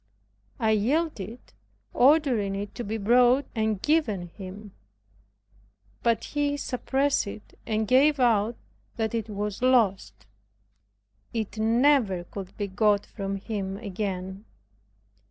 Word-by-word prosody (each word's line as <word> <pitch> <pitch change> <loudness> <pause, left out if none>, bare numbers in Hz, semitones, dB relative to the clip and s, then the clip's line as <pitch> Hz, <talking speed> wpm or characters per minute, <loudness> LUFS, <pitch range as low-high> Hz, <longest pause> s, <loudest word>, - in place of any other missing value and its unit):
I 220 -2 +2
yielded, 235 - -1 0.4
ordering 250 -8 +3
it 200 +1 -5
to 240 - -5
be 220 +1 -3
brought 245 +5 +4
and 220 -3 0
given 220 - 0
him. 195 +3 -10 1.3
But 230 -1 +1
he 290 -1 -1
suppressed 270 -1 0
it, 210 +1 -9
and 220 0 0
gave 280 +5 +4
out 230 -2 +2 0.4
that 220 -2 -2
it 225 -1 -2
was 210 0 -4
lost. 195 - +2 1.1
It 220 -1 -3
never 225 -4 +3
could 190 +1 -9
be 205 - -1
got 205 +1 +2
from 195 -2 -5
him 195 -1 -4
again. 195 -1 -5
220 Hz, 115 wpm, -26 LUFS, 200-250 Hz, 1.3 s, brought